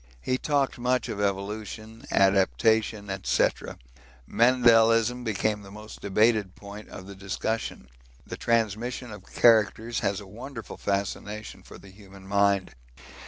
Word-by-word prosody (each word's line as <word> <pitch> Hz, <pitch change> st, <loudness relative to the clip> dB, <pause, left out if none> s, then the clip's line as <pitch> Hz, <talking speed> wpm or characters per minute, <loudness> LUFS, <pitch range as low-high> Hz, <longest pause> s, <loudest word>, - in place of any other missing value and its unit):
He 130 Hz, -, -1 dB
talked 140 Hz, -4 st, 0 dB
much 125 Hz, +1 st, 0 dB
of 105 Hz, -, -3 dB
evolution, 105 Hz, +3 st, -4 dB
adaptation, 100 Hz, -, +2 dB, 0.2 s
&c. -, -, +3 dB, 0.8 s
Mendelism 120 Hz, 0 st, +4 dB
became 105 Hz, -1 st, -1 dB
the 100 Hz, -, -12 dB
most 105 Hz, +2 st, -11 dB
debated 105 Hz, -1 st, +2 dB
point 100 Hz, +1 st, -11 dB
of 95 Hz, -, -9 dB
the 100 Hz, -, -9 dB
discussion; 95 Hz, -4 st, -4 dB, 0.4 s
the -, -, -6 dB
transmission 115 Hz, +2 st, -1 dB
of 105 Hz, -2 st, -12 dB
characters 115 Hz, 0 st, +3 dB
has 100 Hz, -3 st, -1 dB
a 100 Hz, -, -10 dB
wonderful 115 Hz, +4 st, -9 dB
fascination 105 Hz, +2 st, -3 dB
for -, -, -13 dB
the 100 Hz, -, -15 dB
human 95 Hz, -1 st, -15 dB
mind. 100 Hz, -1 st, +2 dB
105 Hz, 125 wpm, -26 LUFS, 100-115 Hz, 0.8 s, Mendelism